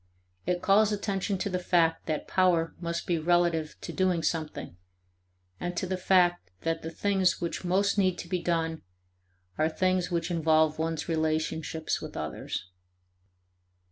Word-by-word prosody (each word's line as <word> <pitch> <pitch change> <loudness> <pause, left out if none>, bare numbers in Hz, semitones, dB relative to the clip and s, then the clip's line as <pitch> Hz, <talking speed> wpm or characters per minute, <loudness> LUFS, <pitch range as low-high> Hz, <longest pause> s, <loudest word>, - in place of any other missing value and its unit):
It 180 -1 0
calls 210 +2 +5
attention 200 -1 -1
to 190 - -2
the 180 - 0
fact 165 -2 +2
that 155 -2 -2
power 175 -3 +2
must 170 -1 -3
be 170 -2 0
relative 170 -1 +1
to - - -6
doing 185 -3 +1
something, 155 - -3 0.8
and 175 0 -4
to - - 0
the 185 +1 -1
fact 180 - +3
that 165 0 -1
the 160 - -5
things 190 +2 +1
which 170 +1 -3
most 195 +3 +2
need 185 -2 +2
to - - -7
be 180 0 -1
done 165 -2 -1 0.8
are 155 +1 +3
things 185 +1 +1
which 170 0 -1
involve 160 -2 +3
one's 160 -1 -2
relationships 160 0 -1
with - - -7
others. - - -4
175 Hz, 150 wpm, -28 LUFS, 160-185 Hz, 0.8 s, calls